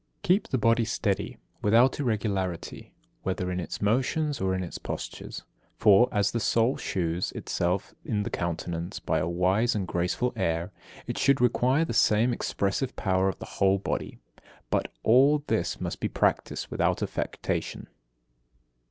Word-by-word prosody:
60. 180 -3 +5
Keep 200 - 0
the 130 - 0
body 115 0 +3
steady, 105 -3 -1 0.2
without 115 +7 +4
irregularity, 100 - -2 0.3
whether 90 -1 -2
in 90 - -2
its 90 - -5
motions 135 +7 +1
or 95 -1 +1
in 95 - -2
its 90 - -6
postures. - - -6 0.3
For, 105 +4 +6
as 105 0 +1
the 120 - -1
soul 115 +3 +2
shews 85 -1 -2
itself 90 +3 -2
in 105 -2 -1
the - - -5
countenance 85 0 -3
by - - 0
a 80 - -1
wise 95 +7 +2
and 100 -3 -2
graceful 90 +9 -1
air, 85 -4 -1 0.3
it - - -4
should 140 0 +4
require 125 +5 +3
the 160 - -4
same 110 +2 +3
expressive 110 +3 -1
power 95 -1 +1
of 95 - -4
the - - -8 0.2
whole 95 0 +5
body. 100 - -3 0.5
But - - 0
all 140 +5 +5
this - - -1
must - - -4
be - - 0
practised - - 0
without - - 0
affectation. - - -3
105 Hz, 155 wpm, -27 LUFS, 95-120 Hz, 0.5 s, For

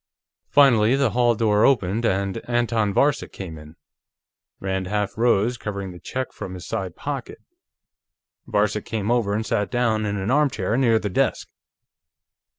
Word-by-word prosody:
Finally, 125 -5 +5
the 135 -4 +1
hall 120 0 +3
door 105 -1 +2
opened, 115 -3 +2
and 100 +1 0
Anton 115 -3 +1
Varcek 140 +8 +1
came 90 -5 -7
in. 75 +1 -14 0.8
Rand 95 -1 -2
half 105 0 -2
rose, 120 0 +2
covering 100 -2 -5
the 90 - -11
Czech 130 +7 -5
from 95 - -7
his 90 - -9
side 95 -3 -4
pocket; - - -5 1.1
Varcek 105 0 0
came 110 -1 -2
over 110 -4 +1
and 110 +1 -2
sat 105 -3 -1
down 110 -4 0
in 100 0 -2
an 100 +4 -2
armchair 130 -8 +1
near 120 -3 +3
the 105 -2 -3
desk. - - 0
105 Hz, 155 wpm, -23 LUFS, 100-120 Hz, 1.1 s, Finally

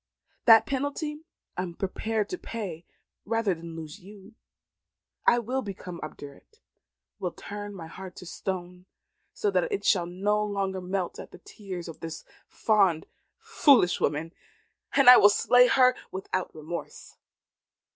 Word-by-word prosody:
That 225 -2 +8
penalty 285 +3 -3 0.3
I - - -2
am 175 -2 -5
prepared 210 +3 -2
to 365 - -4
pay 185 -8 -6 0.4
rather 225 -2 0
than 165 -1 -9
lose 160 +3 -8
you. 200 +2 -14 0.9
I 240 - +6
will 250 +3 -2
become 185 -5 -7
obdurate, 150 - -11 0.6
will - - -3
turn 205 0 -7
my 170 -4 -8
heart 185 +2 -10
to - - -10
stone, 180 0 -6 0.4
so 415 - -1
that - - 0
it 405 - -2
shall 180 -4 +3
no 205 +4 0
more 195 -2 -2
melt 185 0 -3
at - - -9
the - - -13
tears 185 -2 -8
of 165 - -9
this 165 -1 -7 0.2
fond, 195 -7 +2 0.3
foolish 290 - +3
woman; 155 +4 -1 0.6
and 275 -2 +4
I 250 - +12
will 205 - +7
slay 245 +4 +5
her 255 -1 +5 0.2
without 185 -2 -4
remorse. 160 +2 -8
195 Hz, 145 wpm, -27 LUFS, 175-230 Hz, 0.9 s, I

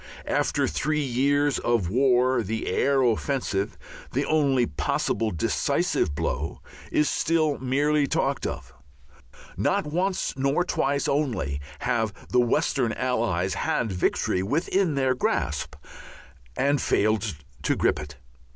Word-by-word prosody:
After - - +1
three 150 - 0
years 140 +3 +1
of 115 -7 0
war 130 0 +3
the 110 +1 -3
air 135 -1 +2
offensive, 120 -4 0 0.4
the 140 +3 0
only 140 -5 +2
possible 110 +8 -1
decisive 75 -3 0
blow, - - -2 0.3
is 150 - +2
still 155 -3 +1
merely 145 +3 +1
talked - - 0
of. 65 - -7 0.8
Not - - +1
once 180 +5 -1
nor 140 +5 +1
twice 140 -5 0
only 120 - -1 0.2
have 115 -4 0 0.2
the 125 - +3
Western 120 0 +1
Allies 110 -8 0
had 110 +2 -1
victory 90 0 0
within 160 - 0
their 130 -2 +2
grasp 75 - -1 0.8
and 140 +1 +2
failed 110 -3 +1 0.3
to - - +1
grip - - +1
it. 75 -1 -8
130 Hz, 120 wpm, -25 LUFS, 110-145 Hz, 0.8 s, war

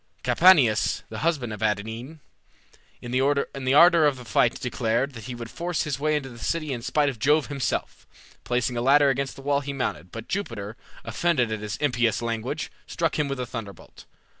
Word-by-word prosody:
Capaneus, 145 - +4
the 110 - -6
husband 150 -9 -1
of 105 - -8
Evadne, 110 +8 -3 0.8
in 120 - -6
the 130 +1 +2 0.5
ardor 170 0 +7
of 140 -3 0
the 125 - -11
fight 115 +1 +2
declared 125 +2 -1
that 115 -3 -9
he 125 -1 -6
would 115 -1 -8
force 175 -1 -2
his 140 -3 -3
way 155 +1 +1
into 140 -3 -3
the 120 -2 -12
city 155 +1 -2
in 120 - -5
spite 145 +4 +1
of 130 -5 -3
Jove 150 +5 +2
himself. 140 -3 -3 0.4
Placing 125 0 -1
a 120 - -1
ladder 140 +3 +5
against 135 0 -3
the 135 - -12
wall 140 0 +2
he 140 0 -5
mounted, 90 - -3
but 115 0 -8
Jupiter, 115 - -4 0.3
offended 125 0 +1
at 110 - -2
his 105 0 -5
impious 120 -6 +1
language, 115 +6 -3 0.2
struck 165 -2 -1
him 150 - +1
with 140 -1 -4
a 125 - -2
thunderbolt. 110 -6 -9
130 Hz, 190 wpm, -25 LUFS, 115-145 Hz, 0.8 s, ardor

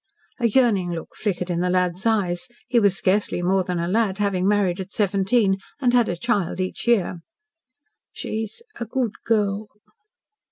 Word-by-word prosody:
A 235 - +3
yearning 215 -6 +3
look 170 -2 -6
flickered 180 -4 -2
in 170 - -1
the 180 +1 +1
lad's 180 +2 +1
eyes 205 -1 0 0.2
he 240 - +3
was 200 -3 +3
scarcely 185 +1 +1
more 190 +1 +2
than 180 0 -2
a 170 0 -1
lad, 200 0 +1
having 195 -3 +1
married 200 -3 +2
at 190 +1 -6
seventeen, 195 0 +2 0.2
and 250 -3 +2
had 240 -2 +4
a 175 - -1
child 200 -4 -1
each 185 +5 -3
year. 200 -7 +2 0.9
"She's 220 - -5 0.2
a 235 - -2
good 235 0 -1
girl." 210 -2 0
195 Hz, 165 wpm, -23 LUFS, 180-220 Hz, 0.9 s, had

